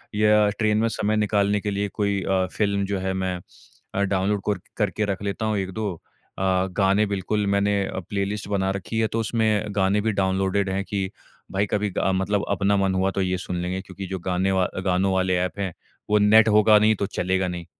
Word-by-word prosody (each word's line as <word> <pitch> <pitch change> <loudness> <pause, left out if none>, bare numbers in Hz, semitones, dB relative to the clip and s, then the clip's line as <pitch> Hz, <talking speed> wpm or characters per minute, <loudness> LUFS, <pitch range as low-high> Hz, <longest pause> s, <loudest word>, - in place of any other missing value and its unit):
या 105 0 +4
ट्रेन 105 -1 +2
में 115 +1 +2
समय 105 0 -1
निकालने 105 -1 +2
के 105 - -2
लिए 100 +1 -1
कोई 100 -2 0
अ, 95 -1 +1
फ़िल्म 100 -2 0
जो 100 -1 -2
है 95 0 -2
मैं 95 -1 -2 0.6
अ, 100 - +1
डाउनलोड 100 +1 0
कोर 100 -1 -1 0.2
करके 105 0 0
रख 100 -1 -3
लेता 100 +2 -2
हूँ 110 -1 0
1-2 100 +1 -3 0.4
अ, - - -5 0.4
गाने 100 +1 +3
बिल्कुल 100 +1 -1
मैंने 100 0 +2
अ, - - -4
प्लेलिस्ट 100 0 -2
बना 95 -2 0
रखी 100 +3 -3
है। 110 - +2
तो 110 +2 -2
उसमें 110 -2 +1
गाने 100 +1 +2
भी 110 +1 0
डाउनलोडेड 95 0 0
हैं 95 +1 -1
कि 100 -2 -3 0.4
भाई 100 +2 +1
कभी 105 0 -1
अ, 95 - +1
मतलब 100 +2 0
अपना 100 0 +2
मन 95 -1 +1
हुआ 95 +1 +1
तो 95 - -2
ये 95 0 0
सुन 90 0 -5
लेंगे। 90 +2 -3
क्योंकि 95 +1 -8
जो 95 0 -4
गाने 90 +2 0
व 95 -1 +2 0.2
गानों 95 +1 +2
वाले 95 -1 +1
एप 90 +2 -7
हैं 95 -3 -2 0.4
वो 105 - +4
नेट 110 +2 +6
होगा 105 0 +6
नहीं 110 +1 +4
तो 100 - -2
चलेगा 95 0 -1
नहीं। 90 -1 -5
100 Hz, 210 wpm, -24 LUFS, 95-105 Hz, 0.6 s, नेट